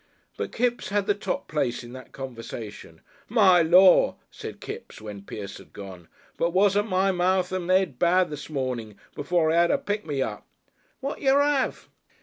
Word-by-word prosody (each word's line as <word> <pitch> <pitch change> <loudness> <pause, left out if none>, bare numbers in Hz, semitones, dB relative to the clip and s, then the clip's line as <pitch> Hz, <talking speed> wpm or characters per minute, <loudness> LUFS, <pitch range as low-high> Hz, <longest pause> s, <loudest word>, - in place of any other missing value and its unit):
But - - -4
Kipps 240 -4 -1
had 205 0 0
the 205 - +3
top 205 - -4
place 125 -6 -1
in 120 +1 -11
that 130 0 -11
conversation. 115 -9 -8 0.3
"My 195 -6 +6
Lor'!" 180 +3 +6 0.2
said - - -8
Kipps, - - -8
when 105 -2 -8
Pierce 100 0 -8
had - - -17
gone, 95 -4 -10 0.3
"but 170 0 0
wasn't 205 +2 +3
my 190 +1 +2
mouth 185 0 +1
and 185 -1 -3
'ed 185 -9 +2
bad 180 0 +3
this 150 0 -7
morning 125 -7 -4 0.2
before 160 +1 +1
I 165 - +2
'ad 170 0 +4
a - - +3
pick 205 +1 -3
me 140 -4 -1
up!" - - -6 0.6
"Whad 275 +2 -4
jer 275 0 +4
'ave?" 285 -2 +1
175 Hz, 175 wpm, -25 LUFS, 130-195 Hz, 0.6 s, My